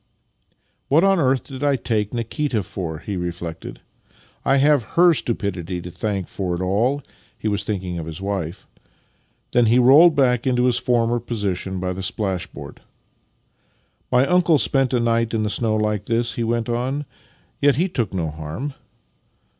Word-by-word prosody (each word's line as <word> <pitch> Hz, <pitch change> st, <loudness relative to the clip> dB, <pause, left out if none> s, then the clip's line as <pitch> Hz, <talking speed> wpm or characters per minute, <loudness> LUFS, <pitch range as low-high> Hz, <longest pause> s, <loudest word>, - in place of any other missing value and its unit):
" -, -, -44 dB
What 155 Hz, +5 st, +4 dB
on 195 Hz, -1 st, +4 dB
earth 130 Hz, -3 st, +2 dB
did 135 Hz, 0 st, -8 dB
I 145 Hz, -1 st, +3 dB
take 110 Hz, -5 st, -1 dB
Nikita 120 Hz, 0 st, -2 dB
for? 90 Hz, -4 st, -5 dB
" -, -, -20 dB
he 100 Hz, -, -3 dB
re 90 Hz, 0 st, -2 dB
flected. 85 Hz, -1 st, -8 dB, 0.3 s
" -, -, -31 dB
I -, -, +4 dB
have 145 Hz, 0 st, +4 dB, 0.2 s
her 175 Hz, 0 st, +7 dB
stupidity 100 Hz, -, -2 dB
to 90 Hz, +1 st, -8 dB
thank 100 Hz, -1 st, -3 dB
for 90 Hz, -3 st, -3 dB
it -, -, -5 dB
all," 120 Hz, +10 st, +1 dB, 0.3 s
(he -, -, -4 dB
was 100 Hz, -1 st, 0 dB
thinking 95 Hz, -4 st, -3 dB
of 80 Hz, -, -6 dB
his 80 Hz, +1 st, -6 dB
wife). 95 Hz, -3 st, -4 dB, 0.9 s
Then 120 Hz, -2 st, +4 dB
he 115 Hz, +3 st, +4 dB
rolled 145 Hz, +7 st, +7 dB
back 125 Hz, -3 st, +2 dB
into 125 Hz, -1 st, +2 dB
his 125 Hz, -2 st, +2 dB
former 120 Hz, -1 st, +1 dB
position 100 Hz, -5 st, -3 dB
by 90 Hz, 0 st, -2 dB
the 95 Hz, -, -6 dB
splashboard. 95 Hz, -2 st, -4 dB, 0.7 s
" -, -, -42 dB
My 125 Hz, +1 st, +4 dB
uncle 175 Hz, -1 st, +4 dB
spent 135 Hz, -2 st, +2 dB
a 125 Hz, -, +2 dB
night 115 Hz, -1 st, +1 dB
in 110 Hz, -, 0 dB
the 105 Hz, -, -1 dB
snow 110 Hz, +1 st, +1 dB
like 105 Hz, -1 st, -1 dB
this," 120 Hz, 0 st, 0 dB
he 120 Hz, -, -2 dB
went 115 Hz, 0 st, -1 dB
on, 130 Hz, +5 st, -2 dB, 0.3 s
" -, -, -37 dB
yet 145 Hz, -2 st, +4 dB
he 175 Hz, +7 st, +1 dB
took 130 Hz, -, -2 dB
no 85 Hz, -5 st, -2 dB
harm. 80 Hz, -, -6 dB
115 Hz, 185 wpm, -22 LUFS, 95-130 Hz, 0.9 s, her